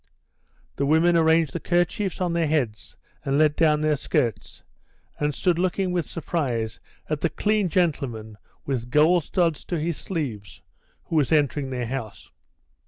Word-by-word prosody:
The 140 - 0
women 165 +3 +4
arranged 160 -3 +3
the - - -2
kerchiefs 175 +3 0
on 175 -2 0
their 170 -2 +1
heads 130 -9 -2 0.3
and 140 0 0
let 150 -1 +4
down 150 -2 +3
their 155 -1 +2
skirts, 120 -5 -2 0.6
and 150 0 +1
stood 170 +4 0
looking 185 +1 0
with 175 -3 -2
surprise 125 -10 -2 0.3
at 155 -1 -2
the 170 - +1
clean 210 -1 0
gentleman 125 - -1 0.3
with 125 -3 -3
gold 155 +5 +4
studs 170 -5 0
to 175 - -2
his 160 0 -2
sleeves 125 - -5 0.4
who 165 - -2
was 145 -1 +2
entering 145 -2 +1
their 125 -2 -3
house. 115 -4 -6
155 Hz, 155 wpm, -24 LUFS, 135-170 Hz, 0.6 s, women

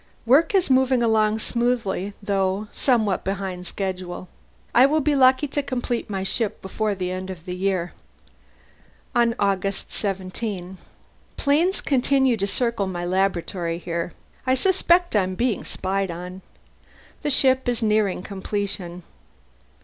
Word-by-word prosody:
Work 285 - +4
is 370 -7 +3
moving 260 -1 +4
along 220 -1 +3
smoothly, 230 -4 -1
though 195 +1 0
somewhat 220 -7 +1
behind 190 -2 -3
schedule; 185 -2 -4 0.4
I 250 +3 +7
shall 310 +2 +2
be 295 0 +2
lucky 260 +2 +5
to 290 - -1
complete 250 -4 -3
my 195 -2 -2
ship 215 +2 -1
before 210 +2 -2
the 180 -1 -3
end 185 +1 -4
of 180 -3 -8
the 180 - -4
year." 185 -2 -1 1.2
On 235 -1 +3
August 195 0 -1
17: 190 -1 -4 0.6
"Planes 320 +7 +2
continue 265 -1 +2
to 200 -1 -1
circle 235 -2 0
my 175 -2 -3
laboratory 180 -2 0
here. 170 0 -4 0.3
I 260 - +4
suspect 355 - +3
I 205 - +5
am 185 0 -2
being 235 0 0
spied 195 0 -2
on. 180 +2 -7 0.8
The 300 - -1
ship 260 -2 +3
is 240 -1 0
nearing 210 -4 +1
completion. 190 -3 -4
205 Hz, 135 wpm, -23 LUFS, 185-250 Hz, 1.2 s, I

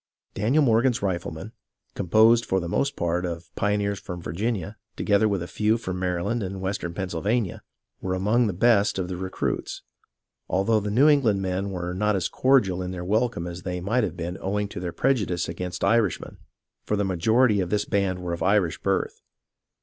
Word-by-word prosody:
Daniel 125 +10 +2
Morgan's 120 -1 +2
riflemen," 90 -3 -3 0.4
composed 110 +5 +4
for 95 - 0
the 85 - -4
most 140 +10 0
part 85 +1 -1
of 85 -1 -5
pioneers 100 -1 0
from 90 0 -7
Virginia, 100 +4 -3 0.2
together 105 +1 +2
with 100 -4 -1
a - - -6
few 110 +4 +1
from 95 -5 -5
Mary 90 -1 -1
land 120 +3 -1
and 95 -1 -4
Western 95 -2 -3
Pennsylvania, 95 +4 -1 0.4
were 95 0 -1
among 110 +6 +2
the 100 - -1
best 105 +1 +3
of 90 -1 -2
the 90 - -3
recruits, 95 +1 -3 0.7
although 105 +4 +2
the 105 0 -3
New 125 +8 +4
England 120 -10 +3
men 95 +1 -2
were 90 -2 -4
not 105 +2 +1
as 95 - -1
cordial 105 -9 +2
in 90 - -4
their 90 -1 -5
welcome 110 -2 0
as 90 +1 -6
they 90 0 -4
might 110 +7 0
have 90 -3 -3
been 85 +2 -4
owing 105 +2 -1
to - - -6
their 90 -1 -4
prejudice 100 -8 0
against 90 +1 -5
Irishmen, 105 -1 +1 0.4
for 105 - -1
the 100 -1 0
majority 105 +5 +3
of 90 -2 -1
this 105 +1 0
band 95 -2 -1
were 85 -1 -2
of 85 - -5
Irish 100 -4 +2
birth. - - -1
95 Hz, 190 wpm, -25 LUFS, 90-110 Hz, 0.7 s, composed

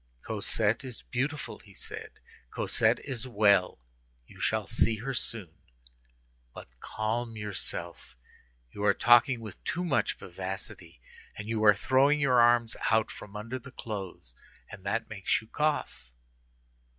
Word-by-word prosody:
"Cosette 110 +2 0
is 125 -3 -7
beautiful," 145 +5 -3
he 100 -2 -18
said, - - -6 0.4
"Cosette - - +2
is 130 -2 -5
well. 100 -5 +3 0.5
You - - -16
shall - - +1
see 110 - +2
her 125 +6 -4
soon; 105 -8 -4 1.0
but - - -9
calm 115 - -3
yourself; 105 - -5 0.5
you 100 - -6
are 100 -1 +4
talking 120 +1 +5
with 110 -3 -9
too 175 - -2
much 130 -10 +1
vivacity, 95 -4 -7 0.4
and 105 - -7
you 110 -1 -1
are 105 -2 +7
throwing 135 +7 +3
your 130 -4 +5
arms 120 -1 +4
out 110 -1 +3
from 105 0 -10
under 115 +5 -4
the 135 +3 -12
clothes, 95 - -7 0.4
and 105 -3 -10
that 115 +3 0
makes 100 -4 0
you 110 - -13
cough." 150 - -1
110 Hz, 140 wpm, -29 LUFS, 100-125 Hz, 1.0 s, are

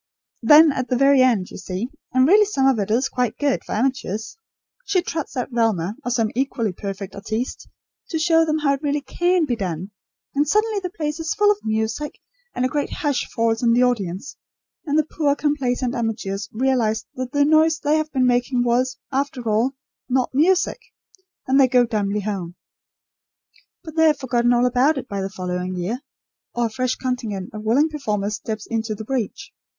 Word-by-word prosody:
Then 310 +1 +7
at 260 -2 -3
the 250 - +1
very 275 0 +5
end, 230 -8 +2
you - - -8
see 190 +5 -4 0.2
and 255 +1 +4
really 420 +5 +6
some 275 -10 0
of 265 -4 +3
it 200 - -2
is 240 +5 +2
quite 250 -3 -2
good 285 -2 0
for - - -4
amateurs 225 -3 -2 0.5
she 390 -6 +1
trots 320 -6 -4
out 250 - -2
Velma, 220 -5 0
or 245 - -2
some 230 -3 +1
equally 240 -4 -1
perfect 195 0 -6
artiste, 220 +5 -4 0.4
to 325 - -1
show 325 0 +4
them 310 -1 0
how 290 -2 +2
it 275 - -4
really 290 -1 0
can 350 +5 +1
be 250 -5 -1
done; 185 -2 -4 0.4
and 290 +1 +1
suddenly 425 +4 +2
the 365 -2 -4
place 305 -2 -4
is 320 -1 -2
full 415 0 +4
of 415 - -1
music, 220 +7 -2 0.4
and 250 - 0
a - - +3
great 290 +1 -2
hush 290 -4 -1
falls 230 0 0
on 235 -1 +3
the 245 +2 +4
audience, 205 -2 -2 0.5
and 290 +1 +1
the 310 - +3
poor 295 -2 0
complacent 260 -4 -1
amateurs 205 -4 -3
realise 225 -3 0
that 255 -1 -5
the 285 0 +3
noise 315 +1 +4
they 300 0 +1
have 310 0 -2
been 260 -2 +2
making 245 0 +2
was, 250 +2 +1
after 265 -3 -2
all, 225 +5 +1 0.3
not 255 0 +1
music; 360 - +2 0.7
and 265 +1 +4
they 265 - +6
go 250 -1 +4
dumbly 210 -2 -1
home. 190 -4 -4 1.3
But 315 -2 -9
they 320 0 +4
have 300 -2 +3
forgotten 245 -2 +1
all 245 0 +3
about 255 +5 +3
it 260 - -5
by 200 -1 -3
the 190 - -3
following 180 -1 -4
year; 195 +9 -3 0.5
or 240 0 +1
a - - -1
fresh 255 +1 -1
contingent 225 -7 -4
of 215 - -6
willing 250 +9 +3
performers 210 -9 -2
steps 215 0 -5
into 225 -1 -2
the 220 - -8
breach. 250 -4 -3
250 Hz, 195 wpm, -22 LUFS, 220-290 Hz, 1.3 s, Then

